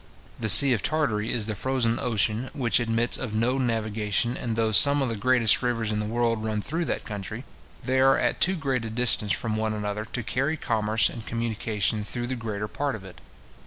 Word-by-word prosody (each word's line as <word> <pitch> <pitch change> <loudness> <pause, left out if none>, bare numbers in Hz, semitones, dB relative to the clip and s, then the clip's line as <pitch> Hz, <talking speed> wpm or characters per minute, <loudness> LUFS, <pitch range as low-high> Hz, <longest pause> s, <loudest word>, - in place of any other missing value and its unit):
The 110 - -1
sea 130 +9 +11
of 110 - -2
Tartary 120 -9 -2
is 115 -3 +1
the 110 - -4
frozen 120 0 -2
ocean, 115 +1 -1
which 120 -7 +1
admits 120 0 +1
of 115 -5 -6
no 125 +4 -1
navigation; 110 -1 -2
and 115 -4 -5
though 110 -1 -1
some 140 +6 +6
of 130 - -2
the 115 - -4
greatest 120 0 +2
rivers 115 -3 -2
in 105 - -2
the 105 - -4
world 115 -1 -2
run 110 -1 -3
through 165 +10 -4
that - - -4
country, 105 +4 -7 0.4
they 130 +1 -1
are 135 +1 +3
at - - -2
too 190 +2 +4
great 135 -7 -3
a 115 - -6
distance 110 -3 +2
from 110 -2 -2
one 110 0 -3
another 105 0 -5
to 120 +2 -6
carry 135 +8 -2
commerce 110 -3 0
and 115 -3 -9
communication 110 -2 -2
through 120 +3 -5
the 130 +2 -4
greater 105 -3 -6
part 140 +3 -4
of 105 - -11
it. 95 -1 -13
115 Hz, 210 wpm, -24 LUFS, 110-125 Hz, 0.4 s, sea